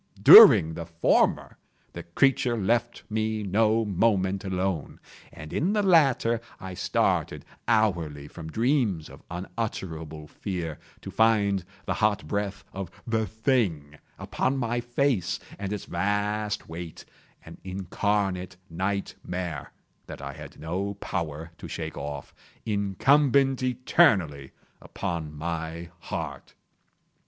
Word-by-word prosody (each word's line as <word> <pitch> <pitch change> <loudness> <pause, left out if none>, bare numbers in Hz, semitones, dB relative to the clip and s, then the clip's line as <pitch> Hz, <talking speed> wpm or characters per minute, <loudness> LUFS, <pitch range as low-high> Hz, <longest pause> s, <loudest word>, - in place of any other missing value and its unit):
During 80 0 +10
the 85 0 -6
former 85 0 +1 0.4
the - - -6
creature 120 +5 +1
left 120 +3 0
me 110 0 -1
no 110 +3 +2
moment 100 -1 +1
alone, 95 -4 -2 0.3
and 75 -2 -10
in 180 +7 +1
the 210 -1 +1
latter 135 - +3 0.2
I 95 -1 -7
started - - 0 0.2
hourly 85 -11 +1
from 80 0 -9
dreams 115 - 0
of - - -13
unutterable 85 -4 -5
fear 85 -4 -5 0.2
to - - -8
find 105 -4 +2 0.2
the - - -1
hot 105 -7 0
breath 100 +1 -3
of 95 -2 -5 0.2
the 110 -2 0
thing 95 - -1 0.2
upon 135 +1 -1
my 120 -1 -1
face, 120 - 0 0.2
and 100 -1 -4
its 105 - -4
vast 105 +3 -1
weight—an 85 0 -11
incarnate 95 0 -2
nightmare 90 -4 -4 0.4
that - - -8
I - - -6
had - - -11
no 95 +5 -3
power 80 -5 -4
to - - -8
shake 80 -1 -5
off—incumbent 115 - 0
eternally 115 - +2 0.3
upon 80 -4 -4
my 80 +2 -5
heart! - - -6
100 Hz, 110 wpm, -26 LUFS, 85-110 Hz, 0.4 s, During